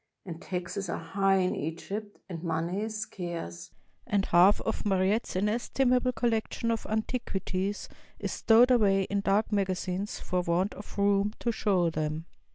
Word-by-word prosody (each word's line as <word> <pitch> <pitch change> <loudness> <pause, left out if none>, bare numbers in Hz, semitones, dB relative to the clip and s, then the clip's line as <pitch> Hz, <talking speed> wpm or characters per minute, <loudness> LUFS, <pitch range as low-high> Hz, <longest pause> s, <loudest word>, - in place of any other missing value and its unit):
And 165 -3 -7
taxes 185 +1 -4
are - - -2
high 195 +3 +1
in 185 -1 +1
Egypt, 200 +7 -5
and 170 -4 -6
money 170 +3 -1
is 220 0 -3
scarce, 175 - -6 0.4
and 200 -1 +1
half 180 +4 +5
of 225 - -2
Mariette's 195 +2 +1
inestimable 245 +5 +1
collection 230 -1 0
of 225 - -2
antiquities 205 -3 -2 0.3
is - - -4
stowed 235 +3 +5
away 200 -5 +4
in 200 +1 -1
dark 205 +3 +1
magazines 190 0 -1
for 180 0 -1
want 175 +3 0
of 205 - -11
room 200 +1 +2
to 235 - +1
show 185 -6 +1
them. 155 0 -2
195 Hz, 150 wpm, -29 LUFS, 180-215 Hz, 0.4 s, half